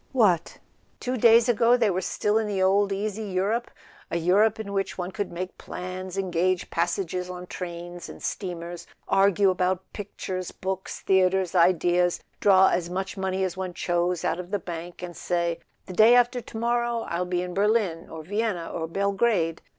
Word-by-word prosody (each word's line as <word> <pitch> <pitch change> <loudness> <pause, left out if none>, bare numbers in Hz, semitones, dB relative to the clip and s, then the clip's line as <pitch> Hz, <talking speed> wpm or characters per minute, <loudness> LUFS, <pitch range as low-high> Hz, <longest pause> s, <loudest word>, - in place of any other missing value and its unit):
What! 190 -10 +2 0.4
Two 250 +1 -2
days 230 0 +6
ago 240 +1 +4
they 225 -4 +2
were 185 +1 -1
still 210 +3 0
in 220 - -1
the 200 -2 -2
old 195 +2 +3
easy 205 +2 -2
Europe, 205 +4 -1 0.4
a - - -1
Europe 200 +6 +3
in 200 -2 -5
which 195 -1 -2
one 180 0 -4
could 205 0 -4
make 180 +2 -6
plans, 185 +1 -6
en¬ 190 -2 -2
gage 180 +1 0
passages 180 +1 -1
on 180 0 -7
trains 175 -1 -7
and - - -11
steamers, 175 -2 -5 0.2
argue 195 0 +4
about 185 0 -1
pictures, 185 -3 -5
books, 190 0 -5
theatres, 190 -1 +2
ideas, 175 0 +3 0.2
draw 190 -1 +6
as 175 -1 -1
much 190 +2 -3
money 190 -1 -1
as 185 -2 -2
one 185 -2 -5
chose 175 0 0
out - - 0
of 180 -1 -7
the 205 - 0
bank, 175 -1 -7
and 175 -1 -6
say: 170 -1 -1 0.3
"The 185 - -8
day 220 +5 +7
after 245 0 +3
to 225 - -9
morrow 235 0 0
I'll 170 +1 -1
be 180 0 -1
in 180 0 -5
Berlin 200 -4 +1
or 160 -1 -8
Vienna 200 -2 -2
or 165 -1 -3
Belgrade." 195 -2 0
185 Hz, 180 wpm, -26 LUFS, 175-205 Hz, 0.4 s, day